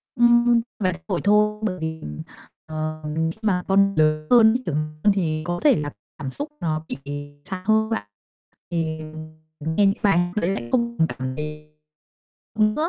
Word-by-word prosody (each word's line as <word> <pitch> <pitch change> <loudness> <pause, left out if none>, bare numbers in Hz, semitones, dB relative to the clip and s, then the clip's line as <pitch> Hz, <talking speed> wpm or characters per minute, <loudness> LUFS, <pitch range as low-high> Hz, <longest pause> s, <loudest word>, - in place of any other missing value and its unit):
Ừm, 240 -1 +5 0.2
vài 185 -3 +1
buổi 185 -5 -1
thôi, 210 +1 +3
bởi 200 -4 -1
vì, 160 0 -3
ừm, 75 0 -6 0.4
ờ, 155 0 -4 0.3
khi - - -13
mà 190 -5 +1
con 195 +1 +4
lớn 155 0 +2
hơn 225 -3 +8
ấy, 255 - -2
trưởng 155 - -1 0.3
hơn 205 - +5
thì 155 -5 -1
có 175 +1 -2
thể 290 -4 +6
là 145 -1 -3 0.3
cảm 135 -3 -5
xúc 290 +2 -4
nó 155 -1 -2
bị - - -4 0.5
xa 185 -1 -5
hơn 220 0 +3
bạn. 105 - -2 0.6
Thì, 160 -2 -1
ừm, 155 0 -8
nghe 205 - +4
những 195 0 +3
bài 195 -4 +4 0.2
đấy 200 -4 +1
lại 120 -12 -3
không 235 -1 +1
còn 160 - +3
cảm 130 -3 -4
thấy 150 +1 -6 0.9
nữa. 215 +10 +2
175 Hz, 180 wpm, -23 LUFS, 155-215 Hz, 0.9 s, hơn